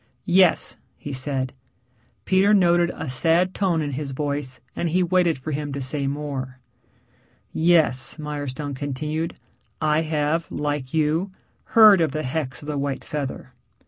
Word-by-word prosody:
"Yes," 180 -1 +3 0.2
he 145 - -7
said. 130 -1 -2 0.7
Peter 195 +2 +4
noted 175 -2 +4
a - - -5
sad 165 +8 +2
tone 180 -6 +1
in 145 - -3
his 140 0 -4
voice, 140 -2 -3 0.2
and 170 - -1
he 180 +3 +2
waited 175 -2 +2
for 145 +4 -6
him 145 0 -3
to 140 - -3
say 140 +1 -2
more. 135 -3 -4 1.0
"Yes," 160 -7 +2
Mirestone 145 -2 -4
continued. 150 +4 -3 0.4
"I 155 0 +2
have, 155 +1 -1
like 145 -3 -3
you, 160 +4 +1 0.5
heard 210 -5 +9
of 155 -4 +1
the 155 - -2
hex 135 +1 -3
of - - -10
the 150 -2 -2
white 140 -1 -3
feather. 135 -3 -5
150 Hz, 145 wpm, -23 LUFS, 140-165 Hz, 1.0 s, heard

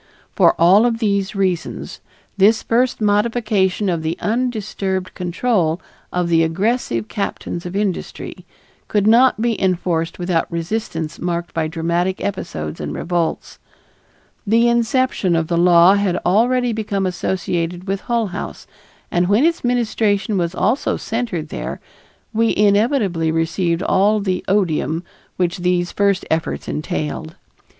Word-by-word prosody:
For - - +4
all 190 +7 +6
of 230 -1 0
these 200 -3 0
reasons 185 -3 -2 0.3
this 210 +3 +4
first 240 +1 +1
modification 210 -2 +1
of 170 -3 0
the 160 +1 -2
undisturbed 210 -5 -2
control 180 -2 0 0.3
of 180 -1 0
the 165 -1 +3
aggressive 165 - 0
captains 180 - -4
of 175 - -7
industry 200 -3 -3 0.4
could 205 -2 +1
not 235 +2 +5
be 230 -1 0
enforced 175 -3 0
without 175 -2 -1
resistance 170 -2 -3
marked 175 -1 -3
by 160 -1 0
dramatic 170 +3 -1
episodes 80 - -4
and 75 0 -4
revolts. 170 -2 -2 0.9
The 230 +3 +4
inception 235 -5 +1
of 165 -1 0
the 170 - +1
law 175 +1 +6
had 200 -3 +1
already 245 +4 +2
become 205 -3 -2
associated 180 -1 -2
with 195 +1 -2
Hull 235 -2 0
House, - - -6 0.5
and 175 +1 +2
when 210 - +3
its 335 0 +1
ministration 220 -3 +1
was 175 -1 -1
also 225 +10 +1
centered 220 -9 -3
there, - - -5 0.5
we 225 +1 +2
inevitably 205 - +2
received 170 +2 0
all 210 +3 +3
the 185 -3 -2
odium 170 -4 0 0.3
which 180 0 0
these 175 0 0
first 200 -2 +1
efforts 160 0 -1
entailed. 155 +2 -4
Mrs. - - -38
190 Hz, 135 wpm, -19 LUFS, 170-220 Hz, 0.9 s, all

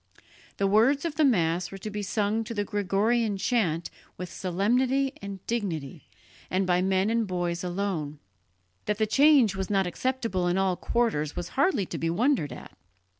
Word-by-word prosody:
The 200 - +1
words 230 +10 +3
of 330 - -2
the 310 +1 +1
Mass 175 - +2
were 195 - -7
to 210 +3 -6
be 210 0 -4
sung 205 +2 0
to 230 - -6
the 205 - 0
Gregorian 205 +2 0
chant 185 -7 0 0.3
with 180 -1 -7
solemnity 250 +9 +1
and 200 -2 -8
dignity, 165 - -4 0.4
and 190 +1 +1
by 180 0 +2
men 190 +2 +1
and 230 -2 +1
boys 175 -1 -2
alone. 175 -5 -3 0.7
That 210 - -1
the 220 - +2
change 270 -3 +5
was 190 -1 -3
not 195 -2 +2
acceptable 210 -2 -1
in 175 +1 +1
all 190 -1 +1
quarters 175 -11 -1
was 175 0 -4
hardly 275 - +1
to - - -6
be 165 - -1
wondered 220 - +1
at. 125 - -10
200 Hz, 175 wpm, -27 LUFS, 180-230 Hz, 0.7 s, change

